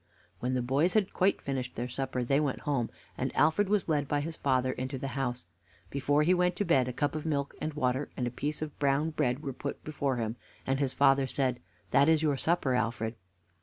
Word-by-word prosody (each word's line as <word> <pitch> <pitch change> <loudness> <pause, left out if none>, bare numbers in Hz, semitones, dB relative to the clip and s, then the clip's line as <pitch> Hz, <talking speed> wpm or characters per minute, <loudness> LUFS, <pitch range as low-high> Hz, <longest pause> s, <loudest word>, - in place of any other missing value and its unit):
When 125 +1 -1
the 125 - 0
boys 140 - +2
had 210 -3 +2
quite 195 +1 +2
finished 130 -2 -3
their 120 +2 -2
supper 130 0 -2
they 135 +4 +2
went 145 -3 -1
home, 135 -6 0 0.3
and - - -1
Alfred 160 +6 +3
was 210 -2 +2
led 145 -3 +1
by 145 0 +1
his 160 +2 -4
father 130 -3 +1
into 130 +1 -4
the 135 +1 -4
house. 125 -5 -2 0.5
Before 145 +2 +2
he 175 +4 +4
went 180 0 +2
to 205 - -1
bed, 130 -7 +3
a - - -1
cup 145 +4 -1
of 155 -1 -3
milk 140 -3 -1
and 155 -1 -3
water 130 0 0
and 125 - 0
a 120 - -2
piece 150 +5 -3
of 150 -2 -8
brown 145 +3 +2
bread 130 -1 0
were 135 -3 -3
put 140 +2 -5
before 140 -3 -1
him, 115 0 -2 0.3
and 135 +1 0
his 135 -2 0
father 135 -1 +4
said: 130 -2 0 0.3
"That 140 +3 +5
is 160 -1 +4
your 150 -2 +2
supper, 155 -2 +1
Alfred." 115 -2 0
140 Hz, 225 wpm, -30 LUFS, 130-155 Hz, 0.5 s, That